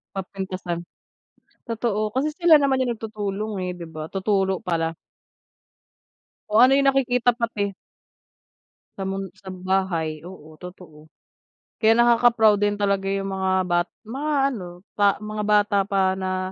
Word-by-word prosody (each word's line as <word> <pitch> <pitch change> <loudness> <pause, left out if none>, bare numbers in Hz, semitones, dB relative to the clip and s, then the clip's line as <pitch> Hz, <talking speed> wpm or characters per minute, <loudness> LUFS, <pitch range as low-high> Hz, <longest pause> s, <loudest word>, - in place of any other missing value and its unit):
Mapintasan. 185 -2 -5 0.8
Totoo, 220 -2 -1
kasi 275 +6 -1
sila 340 -1 +6
naman 270 -2 +2
yung 240 -2 -2
nagtutulong, 215 -1 -4
eh, 180 - -2
'di 170 - -7
ba? 155 0 -7
Tuturo 195 -1 0
pala. 165 -2 -1 1.6
O, 210 +1 +3
ano 255 - +6
yung 275 - +2
nakikita 250 -3 +2
pati. 215 -4 -2 1.2
Sa 195 - -4
mun 195 0 -4
sa 190 0 -9
bahay, 180 -4 -2
oo, 160 -4 -12
totoo. 175 -4 -12 0.7
Kaya 220 0 +4
nakaka-proud 235 -3 +4
din 205 0 +1
talaga 200 -1 0
yung 195 0 -2
mga 190 -1 0
bat 175 0 +1 0.2
mga 270 +7 -4 0.2
ano, 180 -6 -8
pa 205 -1 +3
mga 210 0 -4
bata 205 -1 +3
pa 190 -2 +2
na 185 0 -2
195 Hz, 135 wpm, -23 LUFS, 185-225 Hz, 1.6 s, sila